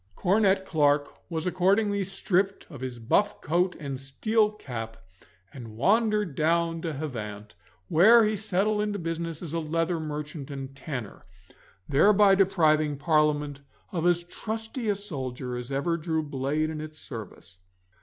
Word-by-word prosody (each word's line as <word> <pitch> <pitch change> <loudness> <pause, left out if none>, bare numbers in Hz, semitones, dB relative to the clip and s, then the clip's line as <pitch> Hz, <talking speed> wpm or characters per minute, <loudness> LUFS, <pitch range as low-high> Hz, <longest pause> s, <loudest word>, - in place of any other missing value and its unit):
Cornet 195 0 +2
Clarke 145 -4 +2 0.2
was 160 -2 -3
accordingly 200 +3 +2
stripped 195 0 -1
of 140 -5 -9
his 130 -2 -5
buff 200 - +1
coat 180 +3 +1
and 140 -3 -5
steel 210 +11 +1
cap, 115 - -7 0.6
and 115 -5 -10
wandered 210 - +2
down 165 +2 +1
to 165 -2 -3
Havant, 105 -8 -6 0.3
where 220 +8 +7
he 215 0 +1
settled 210 +1 0
into 210 -1 -1
business 165 -1 -4
as 165 -2 -6
a 165 - 0
leather 165 +2 -1
merchant 150 -2 -5
and 135 -1 -7
tanner, 130 -7 -6 0.7
thereby 200 +7 +5
depriving 155 -6 +3
Parliament 150 -2 +1 0.3
of 175 -3 0
as 175 -1 +3
trusty 220 +5 -4
a 205 - +2
soldier 130 - -5
as 125 +2 -6
ever 155 +5 0
drew 160 -1 -1
blade 145 +2 -1
in 155 -1 -5
its 155 0 -7
service. 110 - -9
160 Hz, 145 wpm, -27 LUFS, 140-195 Hz, 0.7 s, where